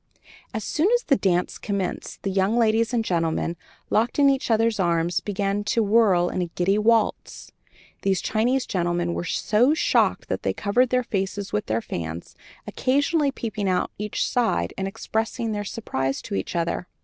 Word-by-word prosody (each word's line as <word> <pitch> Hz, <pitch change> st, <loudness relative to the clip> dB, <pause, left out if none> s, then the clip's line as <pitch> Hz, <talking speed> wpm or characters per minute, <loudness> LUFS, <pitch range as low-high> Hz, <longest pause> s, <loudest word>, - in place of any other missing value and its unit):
As 220 Hz, -, -4 dB
soon 315 Hz, -, +1 dB
as 485 Hz, -, -1 dB
the 275 Hz, -, +3 dB
dancing 180 Hz, -6 st, 0 dB
commenced, 200 Hz, -2 st, -4 dB
and 195 Hz, -1 st, -1 dB
young 195 Hz, +4 st, +2 dB
ladies 225 Hz, 0 st, +2 dB
and 235 Hz, -2 st, 0 dB
gentlemen, 170 Hz, -1 st, 0 dB, 0.4 s
locked 230 Hz, +3 st, +1 dB
in 280 Hz, -1 st, +6 dB
each 270 Hz, -2 st, -2 dB
other's 225 Hz, -1 st, +2 dB
arms, 170 Hz, -1 st, +1 dB
began 200 Hz, 0 st, -2 dB
to 225 Hz, +2 st, +1 dB
whirl 200 Hz, -5 st, +4 dB
in -, -, -3 dB
the 175 Hz, -1 st, -2 dB
giddy 195 Hz, +4 st, +2 dB
waltz, 225 Hz, 0 st, 0 dB, 0.5 s
these 195 Hz, -2 st, +1 dB
Chinese 245 Hz, +7 st, +1 dB
gentlemen 175 Hz, -1 st, -1 dB
were 170 Hz, -, -3 dB
so 240 Hz, -, +2 dB
shocked -, -, +2 dB
that -, -, -2 dB
they -, -, -1 dB
covered 245 Hz, +5 st, +1 dB
their 250 Hz, 0 st, +1 dB
faces 195 Hz, -2 st, -3 dB
with 105 Hz, -, -1 dB
their 110 Hz, +1 st, 0 dB
fans, 85 Hz, -3 st, -6 dB, 0.3 s
occasionally 285 Hz, +2 st, +1 dB
peeping 215 Hz, -6 st, -3 dB
out 180 Hz, -1 st, 0 dB
each 210 Hz, 0 st, -1 dB
side 160 Hz, -, 0 dB
and 190 Hz, -, -3 dB
expressing 225 Hz, +2 st, -2 dB
their 205 Hz, -1 st, -2 dB
surprise 135 Hz, -11 st, -3 dB
to -, -, -7 dB
each 95 Hz, -, -3 dB
other. 170 Hz, +2 st, -1 dB
205 Hz, 175 wpm, -24 LUFS, 175-230 Hz, 0.5 s, in